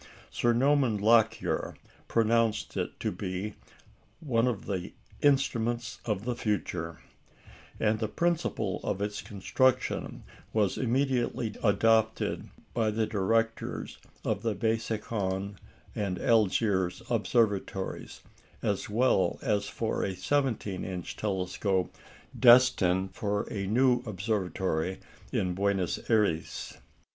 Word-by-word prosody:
Sir 120 - +2
Norman 130 -2 +3
Lockyer 110 +1 +2 0.3
pronounced 115 -1 +1
it - - -3
to - - 0
be 95 +3 -4 0.7
"one 125 -6 +1
of 115 -6 -2
the 95 -3 -4 0.3
instruments 120 -5 +1
of 105 -2 -2
the 125 -1 -1
future"; 90 -7 -2 0.8
and 110 0 +2
the 110 - 0
principle 165 - -1
of 95 - -2
its 105 0 -3
construction 130 +5 0 0.3
was 105 -3 +2
immediately 125 -3 0
adopted 110 +1 +2 0.2
by 115 -2 +1
the 110 +1 0
directors 115 +3 -1 0.3
of 100 - 0
the 115 -2 -1
Besançon 105 -2 -2 0.4
and 100 -3 -2
Algiers 100 -3 +2
Observatories, 105 -4 0 0.4
as 100 -1 -1
well 120 +5 +2
as 105 -5 +1
for 115 - -2
a 95 - -2
17 110 -2 -1
inch 90 -2 -5
telescope 95 -2 -1 0.4
destined 100 -7 +5
for 105 -1 -1
a 100 -2 -2
new 125 +3 +3
observatory 95 -4 -1 0.3
at 90 -1 0
Buenos 95 -1 0
Ayres. 105 -8 0
110 Hz, 105 wpm, -29 LUFS, 95-115 Hz, 0.8 s, destined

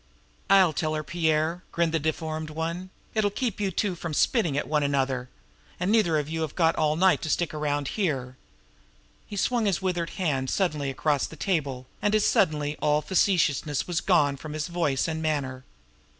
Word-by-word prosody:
"I'll 190 -5 +6
tell 155 +2 -1
her, 155 - -2
Pierre," 160 +2 0
grinned 170 -1 +1
the 165 - +1
deformed 155 0 -3
one. 165 +4 -4 0.2
"It'll 215 -2 +2
keep 220 0 -3
you 200 - +1
two 190 +1 -1
from 165 -3 -5
spitting 170 - +2
at - - -1
one 150 -1 +1
another; 135 -3 0 0.5
and 180 +3 0
neither 200 -8 +3
of 150 -1 -1
you 160 +1 -3
have 155 -2 -3
got 165 -2 +3
all 155 -1 +1
night 185 +3 +4
to 155 - -3
stick 170 +1 0
around 145 -2 -1
here." 135 - -2 0.9
He 205 - -7
swung 230 +2 +1
his 195 - +1
withered 180 -3 -1
hand 140 -8 0
suddenly 155 -7 0
across 145 +1 0
the - - -11
table, 140 -7 -2 0.2
and 205 +1 +2
as 215 - +3
suddenly 150 -4 +2
all 150 0 +2
facetiousness 155 -5 +1
was 175 -2 -1
gone 150 -7 +3
both - - -17
from 155 -1 -6
his 155 +2 -3
voice 165 -6 0
and 160 -1 -3
manner. 135 -5 -2
160 Hz, 190 wpm, -26 LUFS, 145-180 Hz, 0.9 s, I'll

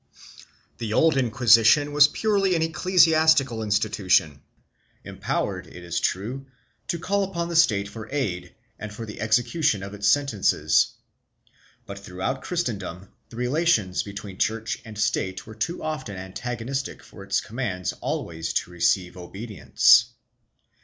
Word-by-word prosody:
The 110 -2 -3
old 160 +6 +4
Inquisition 125 +2 +4
was 145 0 +7
purely 195 +1 +1
an 160 - +1
ecclesiastical 160 -7 +3
institution, 100 -8 +1 0.6
empowered, 95 -2 -3
it 90 - -12
is 85 0 -2
true, 120 +11 -3 0.4
to 170 - -2
call 200 +4 0
upon 170 -3 -3
the 170 - -4
State 105 -12 +3
for 110 +1 -9
aid 90 -11 -3 0.2
and 110 0 -7
for 115 +2 -7
the 105 -1 -9
execution 120 - +1
of 100 +1 -7
its 105 0 -2
sentences, 140 -9 +2 0.9
but 100 0 -8
throughout 100 +8 -4
Christendom 100 - -4 0.2
the - - -13
relations 125 - +1
between 100 -2 -9
Church 115 +1 -1
and 110 -2 -11
State 105 -3 -1
were 110 - -10
too 115 +11 -4
often 135 -10 -4
antagonistic 120 +8 -5
for - - -13
its - - 0
commands 105 -7 -4
always 80 -1 -3
to 90 - -2
receive 90 +1 0
obedience. 95 +4 +3
110 Hz, 130 wpm, -24 LUFS, 100-145 Hz, 0.9 s, was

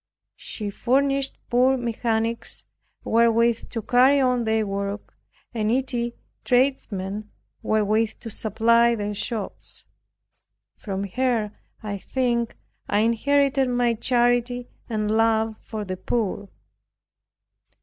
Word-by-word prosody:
She 210 -2 -5
furnished 275 +4 +1
poor 255 +2 +4
mechanics 230 -1 -2 0.4
wherewith 230 0 +2
to 225 -2 -4
carry 255 +5 +5
on 250 -3 +2
their 220 0 +1
work, 200 +1 -4 0.4
and 220 -3 -1
needy 240 0 -1 0.3
tradesmen 215 -6 0 0.3
wherewith 215 +1 +1
to 230 - -7
supply 230 +3 +3
their 210 -1 -3
shops. 210 0 -5 0.9
From 195 -2 -4
her, 225 +1 0 0.3
I 205 -2 -4
think, 235 0 -1 0.3
I 205 - +3
inherited 270 +4 +2
my 245 -1 +2
charity 245 +1 +1 0.2
and 215 -2 -1
love 220 0 +2
for 215 -2 -6
the 185 -1 -4
poor. 205 -2 -2
230 Hz, 105 wpm, -24 LUFS, 215-245 Hz, 0.9 s, carry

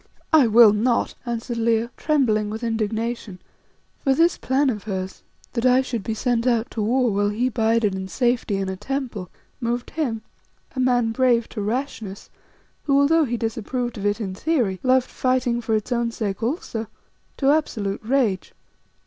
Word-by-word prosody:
"I 295 -6 +7
will 225 -1 +7
not," 235 +3 +1
answered 235 0 -3
Leo, 230 0 +1
trembling 225 -9 +1
with 220 +3 -5
indignation, 225 -2 -2 0.6
for 270 -1 +2
this 335 +4 +4
plan 270 +1 +1
of 210 -3 -6
hers 190 -2 -4 0.3
that 235 - -1
I 255 +1 +5
should 240 -4 -3
be 220 +3 -3
sent 240 +1 0
out 235 -2 +1
to 220 - -3
war, 245 +2 +2
while 205 +1 +1
he 235 +5 0
bided 225 -2 +1
in 190 0 -4
safety 240 -1 0
in 195 -1 -2
a 190 - -3
temple, 235 -5 -4 0.3
moved 240 0 -2
him, 245 -9 -2 0.5
a - - -3
man 245 -3 +2
brave 240 -1 +2
to 215 - -5
rashness, 220 -3 -4 0.5
who, 280 -1 +3
although 315 +3 +4
he 240 -2 -2
disapproved 235 +2 -3
of 205 - 0
it 205 +2 0
in 195 -4 -3
theory, 215 - 0
loved 255 0 +3
fighting 255 -2 0
for 225 -1 0
its 215 +3 -3
own 235 -1 +1
sake 210 -3 -4
also, 230 -3 -3 0.5
to 275 0 +3
absolute 220 -10 -1
rage. 230 -5 0
235 Hz, 170 wpm, -23 LUFS, 215-255 Hz, 0.6 s, I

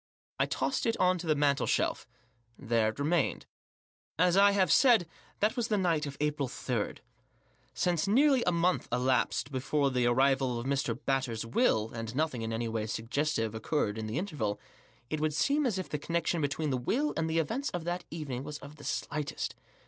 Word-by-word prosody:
I - - +3
tossed 265 - -1
it 230 - +1
on 185 0 +3
to 170 - -6
the 155 - +3
mantel 145 -1 +2
shelf. - - 0 0.5
There 115 -4 +1
it 110 - -7
remained, 150 +1 0 0.7
As 180 +2 +4
I 200 +1 +7
have 190 -4 +2
said* 235 - +5 0.3
that 210 +3 +2
was 240 -3 -1
the 215 - +1
night 165 -5 +1
of 140 - -7
April 150 -2 0
3. 125 -3 -3 0.8
Since 175 0 +1
nearly 265 +4 +4
a 180 - +3
month 175 +1 +1
elasped 130 +3 +1
before 135 +1 0
the 125 -1 +2
arrival 130 0 +2
of 120 - -6
Mr, 135 -4 0
Batters' 130 -5 -1
will, 115 - +1
and 115 0 -6
nothing 150 -5 0
in 110 0 -3
any 115 +1 -2
way 110 -1 -2
suggestive 115 +1 -1
occurred 110 -1 -1
in 110 - -4
the 110 +5 -3
interval 145 - -2 0.5
it 155 - -1
would 155 -1 0
seem 285 - +2
as 215 -6 -1
if 185 - -3
the 150 - -3
connection 170 +2 -1
between 145 +1 -1
the 130 - +1
will 265 - 0
and 160 0 -1
the 160 - 0
events 230 - -1
of 175 -2 -4
that 175 +2 -3
evening 140 -6 -5
was 150 +1 -6
of 145 +2 -12
the 145 - -13
slightest. 150 0 -3
150 Hz, 195 wpm, -30 LUFS, 125-175 Hz, 0.8 s, I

